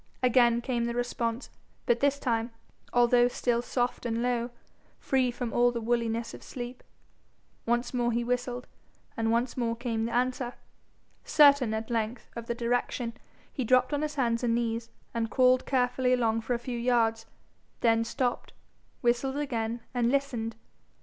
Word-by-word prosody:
Again 240 -1 +4
came 240 -2 -1
the 235 0 -2
response, 240 0 -2 0.3
but 235 0 +2
this 280 +1 +2
time, 230 -4 -1 0.4
although 245 0 +5
still 240 -1 0
soft 245 0 -1
and 230 -1 -1
low, 245 -1 0 0.5
free 260 -2 +1
from 240 -1 -4
all 245 0 +4
the 235 - -3
woolliness 230 0 -1
of - - -10
sleep. 245 0 -7 0.9
Once 240 +2 0
more 240 -1 +1
he 235 +1 0
whistled, 245 0 -2 0.5
and 225 0 0
once 235 +2 0
more 235 -2 -1
came 230 -2 -2
the 230 - -3
answer. 250 0 -1 0.7
Certain 285 -6 +5
at 220 +2 -4
length 230 +1 -2
of 235 0 -6
the 235 - -1
direction, 240 0 -1 0.4
he 260 - -2
dropped 255 +3 +3
on 290 - 0
his 305 0 -2
hands 235 -3 0
and 230 -1 +2
knees, 230 -1 -2 0.2
and 230 -1 -1
crawled 255 0 +3
carefully 255 -1 +2
along 225 -2 +1
for 240 +2 -1
a - - 0
few 240 0 -5
yards, 230 -2 +1 0.5
then 230 -1 +4
stopped, 245 +1 -2 0.5
whistled 245 +3 +1
again, 235 -5 -2
and 240 -2 +2
listened. 245 -5 -1
240 Hz, 160 wpm, -29 LUFS, 230-250 Hz, 0.9 s, although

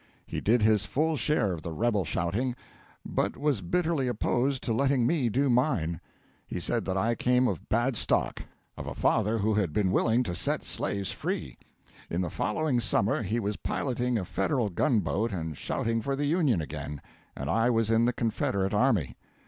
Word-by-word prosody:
He - - -4
did 115 +1 +3
his 110 -2 +4
full 160 +3 0
share 125 -6 +1
of 80 - -6
the 85 - -5
rebel 105 +1 0
shouting, 100 - -1 0.5
but - - -1
was 145 -8 0
bitterly 160 - 0
opposed 125 +3 0
to 115 - 0
letting 135 0 +2
me 130 -3 +2
do 135 +6 +1
mine. 120 - +1 0.5
He - - -4
said - - -1
that 95 0 -1
I 115 +5 +2
came 125 +2 +2
of - - -4
bad 120 +3 +1
stock - - +1 0.4
of - - -6
a - - -5
father 110 +3 +2
who 110 +1 +1
had 100 -7 0
been 95 0 +1
willing 115 +5 +3
to 90 - -3
set 85 - -1
slaves 100 -1 -2
free. - - -4 0.5
In 85 - -1
the 85 -3 -2
following 130 +3 0
summer 110 -1 +1
he 110 +3 -1
was 105 -1 -2
piloting 125 -2 -1
a 95 - -2
Federal 105 +5 0
gun 105 +5 +2
boat 105 +6 -1
and 80 -5 -4
shouting 115 +9 -1
for 135 +5 -1
the 145 +1 -1
Union 145 - +2
again, 75 -1 -6 0.4
and 65 - -4
I 115 - +2
was 115 -2 +2
in 115 +1 +4
the 125 - +2
Confederate 100 -4 -1
army. 105 - +1
115 Hz, 190 wpm, -28 LUFS, 95-125 Hz, 0.5 s, his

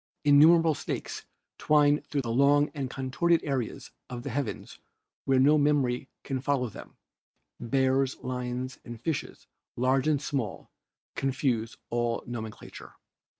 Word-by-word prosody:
Innumerable 160 +3 +6
snakes - - -5 0.3
twine 150 -1 +4
through 145 - -2
long 140 +5 +3
and 140 -4 -4
contorted 150 +7 +1
areas 135 -6 -3 0.2
of 120 -1 -6
the 140 - -4
heavens 130 -1 -4 0.5
where 135 -1 +3
no 150 +3 +5
memory 135 -3 +1
can 135 -2 -3
follow 135 -3 0
them; - - -12 0.6
bears, 130 +2 +1
lions 125 0 -4
and 120 -1 -9
fishes, 155 +4 -4 0.3
large 130 +3 +2
and 150 -2 +2
small, 135 -6 -4 0.4
confuse 125 -4 -1
all 120 -1 -1
nomenclature." 110 -3 -8
135 Hz, 120 wpm, -28 LUFS, 125-145 Hz, 0.6 s, Innumerable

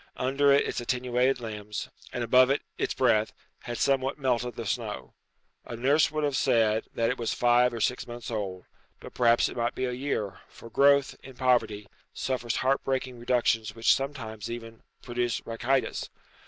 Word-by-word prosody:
Under 140 +2 +2
it 140 - +4
its - - -3
attenuated 125 +1 +1
limbs, 105 -3 -6 0.2
and 120 - -3
above 125 +2 +5
it 140 - +1
its - - -2
breath, 110 -4 +2 0.3
had 120 -1 -4
somewhat 135 -1 +1
melted 125 -3 -1
the 115 - -5
snow. 105 - -4 0.5
A 120 - -7
nurse 140 +6 +3
would 155 0 -2
have 145 -2 0
said 110 -3 +2
that 115 0 +1
it - - -5
was 115 -2 -1
five 120 0 +4
or 115 - -5
six 125 +3 -1
months 120 -1 -7
old, 95 -4 -4 0.3
but - - -11
perhaps 120 -1 +4
it - - -8
might 120 0 -1
be 130 - -1
a 125 - -2
year, 125 -6 -3
for 115 - -13
growth, 140 +2 +4
in 130 -1 -12
poverty, 115 -5 +1 0.3
suffers 125 -3 -2
heart 135 +1 +1
breaking 130 -2 -2
reductions 115 -3 +1
which 115 0 +4
sometimes 125 -7 -4
even 115 -1 -8 0.2
produce 120 -2 -1
rachitis. 120 +4 -1
120 Hz, 175 wpm, -28 LUFS, 115-130 Hz, 0.5 s, above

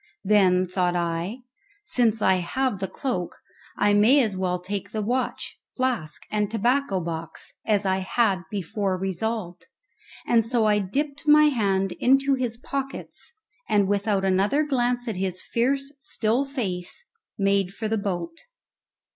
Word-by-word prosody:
Then, 185 -3 +4
thought 180 -1 0
I, 170 +7 -2 0.4
since 230 - +1
I 190 0 +4
have 215 +5 -1
the 190 - -2
cloak 240 - -3 0.4
I 205 0 +3
may 235 +7 +5
as 210 -4 -1
well 185 -1 0
take 195 +2 -5
the 215 - -3
watch, 250 +4 -2 0.2
flask, 250 - -1
and 210 -1 0
tobacco 230 -1 +1
box, 165 -1 -5
as 205 -2 +2
I 190 0 +2
had 190 0 +1
before 200 -1 -2
resolved; 190 +2 -3 0.6
and 230 -1 +4
so 230 0 +1
I 210 -1 +3
dipped 280 - -3
my 300 0 +7
hand 195 -7 +1
into 270 +2 +4
his 245 -3 -1
pockets, 270 +2 -5 0.4
and 205 -2 +3
without 200 -1 +1
another 200 +10 +2
glance 245 -4 0
at 220 -5 -2
his 185 -1 -2
fierce 275 +4 0
still 240 0 0
face 225 - -4 0.3
made 195 -2 +2
for 220 +3 -4
the 220 0 0
boat. 200 - -3
210 Hz, 145 wpm, -25 LUFS, 190-250 Hz, 0.6 s, my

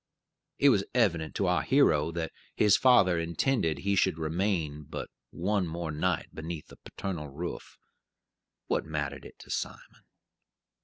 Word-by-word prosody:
It 145 - +6
was 100 -7 +3
evident 85 -10 +1
to 100 - +1
our 90 0 +2
hero 80 - +3
that 80 -1 -3 0.2
his 105 -2 +5
father 95 -9 +5
intended 85 - 0
he 100 +8 0
should 90 -3 +2
remain 80 -2 -1
but 75 - -7 0.2
one 95 +1 0
more 85 0 -4
night 85 +4 -1
beneath 80 0 -6
the - - -14
paternal 85 -6 -5
roof. 85 +6 -6 0.9
What - - 0
mattered 75 -3 -4
it - - -12
to - - -11
Simon? - - -5
85 Hz, 145 wpm, -29 LUFS, 80-100 Hz, 0.9 s, It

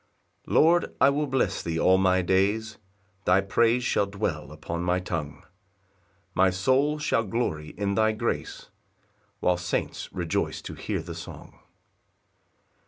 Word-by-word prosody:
1 - - -4
Lord, 170 +2 +4
I 140 - +6
will 150 +1 -1
bless 130 -7 0
thee 80 -1 -2
all 95 +2 +4
my 95 -1 +3
days, 100 +4 +1 0.5
Thy 90 +2 +5
praise 115 +5 +2
shall 100 - +1
dwell 100 -7 -3
upon 80 +2 -5
my 90 +1 +1
tongue; 80 -5 -5 0.9
My 95 0 +4
soul 130 +11 +2
shall 150 -6 +1
glory 95 -9 -3
in 100 0 -1
thy 110 +1 +3
grace, 110 - -4 0.7
While 90 -1 +2
saints 90 0 -3
rejoice 85 -3 -2
to - - -7
hear - - -4
the - - -7
song. - - -10
95 Hz, 140 wpm, -26 LUFS, 90-115 Hz, 0.9 s, I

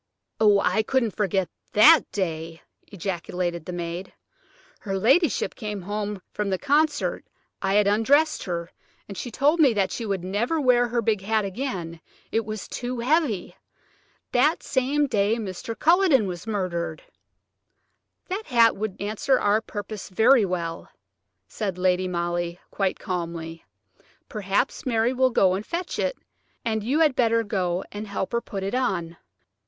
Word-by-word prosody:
"Oh! 210 -2 +5
I 220 - +2
couldn't 235 -2 0
forget 195 -3 0 0.3
that 250 +9 +7
day," 165 -4 -4 0.2
ejaculated 175 -3 -3
the - - -5
maid; 175 +1 -5 0.7
"her 195 -2 -3
ladyship 270 - +2
came 210 -3 -5
home 205 0 -4
from 210 -1 -2
the 190 - 0
concert–I 290 - -1
had 210 0 +5
undressed 275 +10 +3
her, 170 -1 -4 0.4
and 200 - -8
she 245 - -5
told 290 +8 +2
me 280 -6 +6
that 195 -3 0
she 235 - -4
would 195 -5 -2
never 215 - -1
wear 250 -3 +4
her 235 0 -1
big 210 -2 +1
hat 215 +1 0
again–it 190 -1 -4
was 215 -1 -5
too 250 0 -4
heavy. 275 - 0 0.8
That - - +2
same 280 +3 +1
day 215 -4 +1
Mr. 220 +1 -5
Culledon 330 - +4
was 180 +2 -6
murdered." 175 -6 -3 1.2
"That 390 +4 -4
hat 235 -4 +5
would 210 -2 -4
answer 215 +6 +1
our 205 +2 +2
purpose 210 -2 -7
very 225 +4 +5
well," 170 -3 -4 0.6
said 195 -4 -4
Lady 185 0 +1
Molly, 175 0 -2
quite 195 -2 -1
calmly. 165 -2 -5 0.6
"Perhaps 205 +3 -1
Mary 235 0 +1
will 260 0 +3
go 190 -6 +3
and 195 +2 -2
fetch 345 +8 -4
it, - - -1 0.5
and 220 -2 -1
you 275 +8 +1
had 300 -5 +4
better 230 -1 +3
go 185 -4 -1
and 210 +1 -6
help 195 -1 -3
her 235 0 0
put 195 -4 -6
it 195 - -3
on." 170 -10 -1
210 Hz, 150 wpm, -25 LUFS, 185-245 Hz, 1.2 s, that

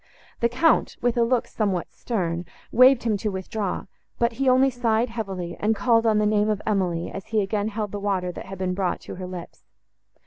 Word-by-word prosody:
The 235 - +2
Count, 310 +7 +2
with 240 -1 +1
a 240 - +2
look 240 0 +1
somewhat 195 -5 -2
stern, 175 -7 -2 0.3
waved 255 +1 +6
him 220 -3 +1
to 210 +2 -2
withdraw; 190 0 -3 0.3
but 235 0 +2
he 260 +3 +1
only 260 +1 +5
sighed 235 -1 +1
heavily, 195 -7 -4
and 220 +2 +2
called 230 +2 +3
on 215 -1 +4
the 210 - +2
name 210 0 +2
of 210 -2 0
Emily, 180 -5 0
as 195 +1 -7
he 220 -1 +1
again 205 +1 -1
held 215 -1 -3
the 205 - -4
water, 190 -3 -1
that 180 - -9
had 195 0 -7
been 185 0 -1
brought, 185 -1 -1
to - - -8
her 185 -1 -5
lips. 180 -2 -9
210 Hz, 210 wpm, -24 LUFS, 190-235 Hz, 0.3 s, waved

